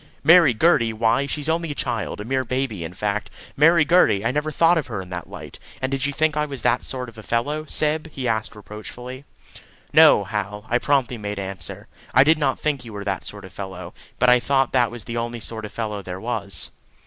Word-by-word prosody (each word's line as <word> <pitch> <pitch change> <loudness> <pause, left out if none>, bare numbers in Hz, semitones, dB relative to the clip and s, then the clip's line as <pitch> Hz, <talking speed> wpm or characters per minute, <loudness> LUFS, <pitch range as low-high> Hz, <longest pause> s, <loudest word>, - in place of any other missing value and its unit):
"Marry 165 -1 +7
Gertie! 125 -6 +3
Why, 115 +5 +1
she's 150 +1 -3
only 165 0 0
a 145 - -4
child! 115 -6 -2
A 105 - -5
mere 130 +2 0
baby, 130 -7 -2
in 85 +2 -7
fact. 105 +2 -2 0.3
Marry 160 +2 +5
Gertie! 150 - +4
I 115 - +2
never 150 +3 -1
thought 165 +2 +4
of 150 - -5
her 110 -5 -4
in 95 -1 -8
that 85 -1 -6
light; - - -10 0.2
and 130 0 -2
did 135 0 0
you - - -1
think 155 +1 +1
I 150 0 0
was 140 -5 -7
that - - +2
sort 125 -1 -4
of 115 -2 -12
a - - -8
fellow, 145 +8 -1
Syb?" 155 +2 0
he 135 -4 -4
asked 110 -2 -1
reproachfully. 120 +6 -9 0.7
"No, - - +7
Hal," 105 0 -4
I 120 - +2
promptly 130 -3 +1
made 105 -1 -4
answer. 95 -3 -6 0.3
"I 135 - +8
did 155 +2 +4
not 135 -4 0
think 145 -4 -1
you 115 -3 -10
were 100 -1 -5
that 95 -2 -3
sort 105 -1 -7
of 95 - -13
fellow; 95 -3 -7 0.2
but 125 - +3
I 125 0 +6
thought 135 0 +1
that 125 -3 +3
was 120 -1 -8
the 115 - -4
only 120 0 -3
sort 110 0 -4
of 105 - -8
fellow 105 -3 -4
there 90 -1 -7
was." 105 -3 -4
120 Hz, 230 wpm, -23 LUFS, 105-145 Hz, 0.7 s, I